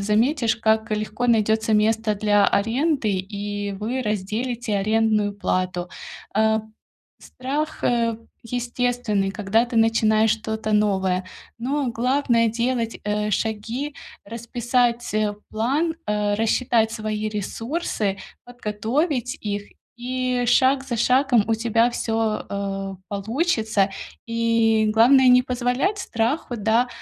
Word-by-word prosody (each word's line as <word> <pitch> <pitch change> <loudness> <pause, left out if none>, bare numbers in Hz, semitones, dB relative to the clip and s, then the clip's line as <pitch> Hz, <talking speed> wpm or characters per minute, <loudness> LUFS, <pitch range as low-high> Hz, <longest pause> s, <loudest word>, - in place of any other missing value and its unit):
заметишь- 225 +4 +2
как 220 0 +1
легко 215 +3 -2
найдётся 220 -1 +2
место 220 0 +2
для 205 0 +3
аренды, 250 +4 +1
и 205 +1 -4
вы 225 +6 -3
разделите 215 +2 -2
арендную 215 0 +1
плату. 185 -2 -2 0.5
Э, 220 0 +3 0.6
страх, 295 +5 -4
э, 230 -2 +1 0.2
естественный, 240 -4 -1
когда 205 +3 +1
ты 240 -1 -5
начинаешь 225 -1 +3
что-то 220 0 -2
новое, 190 -3 +1 0.3
но 275 +3 -1
главное- 235 -1 +2
делать, 235 0 -1
э, 210 0 -1
шаги, 225 +8 -2 0.3
расписать, 235 +1 -1
э, 215 -1 +1 0.2
план, 280 +10 0
э, 210 -1 0
рассчитать 225 +1 +1
свои 215 -1 -3
ресурсы, 215 - -3 0.3
подготовить 245 - -2
их, 205 -1 -3 0.3
и 250 0 -1
шаг 265 +2 +3
за 240 -3 -3
шагом 250 -3 +3
у 225 - +3
тебя 230 +1 +2
всё, 225 -2 -1
э, 195 -1 -3
получится. 220 - 0 0.4
И, 230 -1 +2
главное, 255 +4 +6
не 250 0 +6
позволять 250 - -1
страху, 240 -3 -2
да, 225 +4 +2
225 Hz, 110 wpm, -23 LUFS, 210-245 Hz, 0.6 s, главное